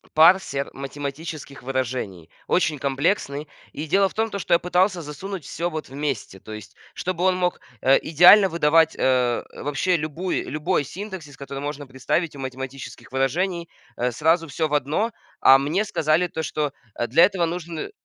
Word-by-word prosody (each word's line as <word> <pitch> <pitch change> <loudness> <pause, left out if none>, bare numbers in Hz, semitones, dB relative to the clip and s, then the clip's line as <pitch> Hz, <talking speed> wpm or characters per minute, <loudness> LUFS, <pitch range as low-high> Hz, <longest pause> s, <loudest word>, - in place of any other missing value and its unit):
парсер 160 -4 +4
математических 140 +1 -6
выражений, 125 -9 -3 0.2
очень 165 -5 +1
комплексный. 140 +1 -1 0.2
И 150 - -5
дело 195 +5 +3
в - - -17
том, 220 0 0
то 200 - -3
что 170 - +2
я - - +3
пытался 180 0 +1
засунуть 165 +4 -7
всё 170 +2 -3
вот 155 -4 -6
вместе, 135 -8 -4
то 110 - -10
есть, 105 -2 -10 0.2
чтобы 180 -1 -3
он 185 0 +4
мог, 180 -1 0 0.2
э, 135 +1 +5
идеально 180 +5 +7
выдавать, 160 -1 +3
э, 125 -2 +2 0.2
вообще 145 +6 +1
любую 160 +4 -3
любой 155 +3 0
синтаксис, 185 -5 -8
который 140 0 -7
можно 145 0 -5
представить 140 +5 -2
у - - -10
математических 130 -1 -7
выражений, 170 +7 -1 0.3
э, 125 +1 0
сразу 165 +6 +2
всё 160 +3 -1
в 150 - -6
одно. 150 - 0 0.3
А 135 0 +7
мне 160 +10 0
сказали 160 -3 +1
то, 160 -1 -4
что, 150 -3 -2 0.2
э, 120 - -1
для 140 +8 +5
этого 185 -3 0
нужны 170 - -5
155 Hz, 165 wpm, -23 LUFS, 135-175 Hz, 0.3 s, идеально